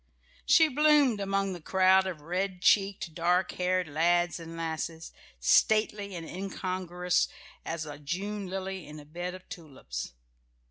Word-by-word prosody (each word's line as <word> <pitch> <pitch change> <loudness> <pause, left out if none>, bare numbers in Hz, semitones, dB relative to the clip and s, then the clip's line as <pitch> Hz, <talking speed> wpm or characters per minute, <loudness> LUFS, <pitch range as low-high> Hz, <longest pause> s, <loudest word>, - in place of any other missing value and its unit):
She 320 -2 +6
bloomed 295 -5 +4
among 195 0 0
the 175 - -8
crowd 190 +2 +4
of 170 -5 -5
red 180 +4 -2
cheeked, 195 -4 +2
dark 180 +3 +1
haired 180 -1 0
lads 175 +3 +1
and 165 0 -9
lasses, 165 0 -4 0.3
stately 205 - +2
and 165 -2 -6
incongruous 180 -1 -1 0.4
as 165 -1 -4
a 145 -1 -8
June 195 +7 -4
lily 190 -1 -5
in 150 +1 -9
a 145 - -12
bed 175 +4 -5
of 185 - -13
tulips. 130 - -7
180 Hz, 140 wpm, -29 LUFS, 165-195 Hz, 0.4 s, She